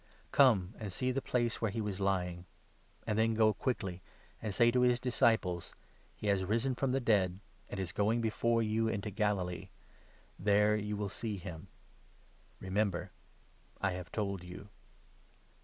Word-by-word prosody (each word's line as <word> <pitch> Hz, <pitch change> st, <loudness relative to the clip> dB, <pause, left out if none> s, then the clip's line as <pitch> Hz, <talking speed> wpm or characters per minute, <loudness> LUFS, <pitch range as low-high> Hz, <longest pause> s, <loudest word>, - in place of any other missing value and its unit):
Come, 110 Hz, -9 st, +5 dB
and 105 Hz, -3 st, -5 dB
see 125 Hz, +7 st, 0 dB
the 135 Hz, +2 st, -1 dB
place 120 Hz, -2 st, 0 dB
where 110 Hz, -, +1 dB
he 105 Hz, -, -4 dB
was 105 Hz, -3 st, -3 dB
lying; 90 Hz, -3 st, -1 dB, 0.6 s
and 110 Hz, 0 st, 0 dB
then 115 Hz, 0 st, +3 dB
go 110 Hz, -1 st, +4 dB
quickly 95 Hz, -9 st, -2 dB, 0.4 s
and 110 Hz, -, -2 dB
say 120 Hz, +3 st, +4 dB
to 125 Hz, +1 st, +2 dB
his 125 Hz, -1 st, +4 dB
7 125 Hz, -, -16 dB
disciples 110 Hz, -8 st, +1 dB, 0.2 s
' -, -, -32 dB
He -, -, -9 dB
has 100 Hz, -2 st, +2 dB
risen 115 Hz, +7 st, +1 dB
from 130 Hz, +1 st, 0 dB
the 135 Hz, -, +2 dB
dead, 100 Hz, -7 st, +2 dB, 0.3 s
and 100 Hz, -, -5 dB
is 95 Hz, -2 st, -3 dB
going 105 Hz, +4 st, +1 dB
before 115 Hz, +1 st, +1 dB
you 110 Hz, +1 st, +1 dB
into 105 Hz, -1 st, -2 dB
Galilee; 95 Hz, -4 st, -1 dB, 0.7 s
there 105 Hz, +2 st, +4 dB
you 105 Hz, 0 st, -2 dB
will 105 Hz, -1 st, -2 dB
see 105 Hz, +1 st, -4 dB
him.' 85 Hz, -4 st, -8 dB, 0.9 s
Remember, 95 Hz, -2 st, -1 dB, 0.7 s
I 95 Hz, -, +1 dB
have 90 Hz, -3 st, -6 dB
told 100 Hz, -4 st, -2 dB
you." 90 Hz, +3 st, -10 dB
105 Hz, 165 wpm, -33 LUFS, 95-115 Hz, 0.9 s, Come